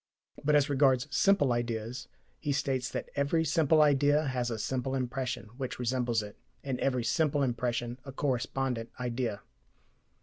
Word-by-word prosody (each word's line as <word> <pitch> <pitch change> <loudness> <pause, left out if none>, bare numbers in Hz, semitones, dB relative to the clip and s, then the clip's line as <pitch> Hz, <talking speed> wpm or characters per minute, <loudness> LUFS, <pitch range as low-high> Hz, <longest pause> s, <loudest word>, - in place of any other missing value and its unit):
But 150 +1 +3
as 145 -1 +4
regards 135 -2 +3
simple 195 -6 +4
ideas, 120 +1 -3 0.3
he 145 - -2
states 135 -3 -1
that - - -5
"every 145 +3 +1
simple 155 0 +4
idea 145 +1 +3
has 125 -3 -1
a 115 - -3
simple 130 +4 -2
impression, 130 -3 -3
which 130 -2 -4
resembles 120 -2 0
it, 105 0 -11 0.2
and 135 -3 -3
every 125 -3 +1
simple 145 +5 +1
impression 120 -1 -1
a 135 - -8
correspondent 130 -3 -1
idea." 120 -4 -2
130 Hz, 145 wpm, -30 LUFS, 120-140 Hz, 0.3 s, as